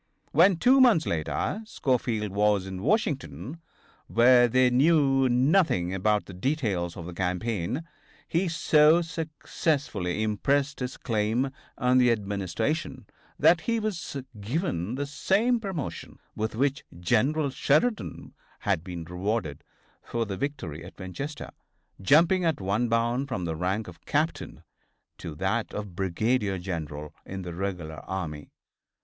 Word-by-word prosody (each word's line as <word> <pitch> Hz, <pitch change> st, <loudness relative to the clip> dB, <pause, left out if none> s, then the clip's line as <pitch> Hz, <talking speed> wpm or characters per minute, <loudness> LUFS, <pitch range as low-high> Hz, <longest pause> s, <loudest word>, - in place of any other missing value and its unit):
When, 175 Hz, +4 st, +5 dB
two 255 Hz, +8 st, +5 dB
months 225 Hz, -11 st, +5 dB
later, 85 Hz, -, -2 dB
Schofield 120 Hz, -, -1 dB
was 100 Hz, -1 st, +2 dB
in 95 Hz, -1 st, -6 dB
Washington, 135 Hz, -, -1 dB, 0.5 s
where 120 Hz, +1 st, +6 dB
they 125 Hz, +1 st, +3 dB
knew 135 Hz, -1 st, +4 dB
nothing 125 Hz, -, +2 dB
about 105 Hz, +2 st, +1 dB
the 95 Hz, -, -10 dB
details 95 Hz, -, -1 dB
of 85 Hz, -, -7 dB
the 90 Hz, -, -7 dB
campaign, 95 Hz, -, -2 dB, 0.4 s
he 175 Hz, +3 st, +1 dB
so 160 Hz, 0 st, +4 dB
successfully 150 Hz, -, -2 dB
impressed 140 Hz, +8 st, 0 dB
his 125 Hz, 0 st, -4 dB
claim 115 Hz, +3 st, 0 dB, 0.3 s
on 125 Hz, +1 st, +3 dB
the 125 Hz, -1 st, +5 dB
Administration 110 Hz, -, -2 dB, 0.3 s
that 170 Hz, -1 st, +5 dB
he 230 Hz, +4 st, 0 dB
was 205 Hz, -9 st, -3 dB, 0.2 s
given 110 Hz, -, -2 dB
the 145 Hz, +2 st, -2 dB
same 210 Hz, -, +1 dB
promotion 190 Hz, -, -5 dB, 0.2 s
with 110 Hz, +1 st, -2 dB
which 140 Hz, +3 st, 0 dB, 0.2 s
General 135 Hz, -, +1 dB
Sheridan 160 Hz, -, 0 dB, 0.3 s
had 80 Hz, -, 0 dB
been 90 Hz, -2 st, -6 dB
rewarded 90 Hz, -2 st, -3 dB, 0.4 s
for 115 Hz, -1 st, -2 dB
the 100 Hz, -2 st, -4 dB
victory 95 Hz, -, -4 dB
at 90 Hz, -, -12 dB
Winchester, 135 Hz, +11 st, -6 dB, 0.5 s
jumping 170 Hz, -, +4 dB
at 165 Hz, -3 st, +1 dB
one 105 Hz, +5 st, 0 dB
bound 120 Hz, +4 st, +1 dB
from 95 Hz, -10 st, -3 dB
the 80 Hz, -1 st, -2 dB
rank 95 Hz, +6 st, -1 dB
of 85 Hz, -2 st, -12 dB
captain 155 Hz, +3 st, -2 dB, 0.6 s
to 80 Hz, -, -7 dB
that 95 Hz, +7 st, -1 dB
of 105 Hz, -4 st, -6 dB
brigadier 100 Hz, +3 st, 0 dB
general 80 Hz, -5 st, -5 dB
in 95 Hz, 0 st, -6 dB
the 90 Hz, -1 st, -6 dB
regular 85 Hz, -4 st, -4 dB
army. 80 Hz, -6 st, -5 dB
115 Hz, 130 wpm, -27 LUFS, 95-150 Hz, 0.6 s, where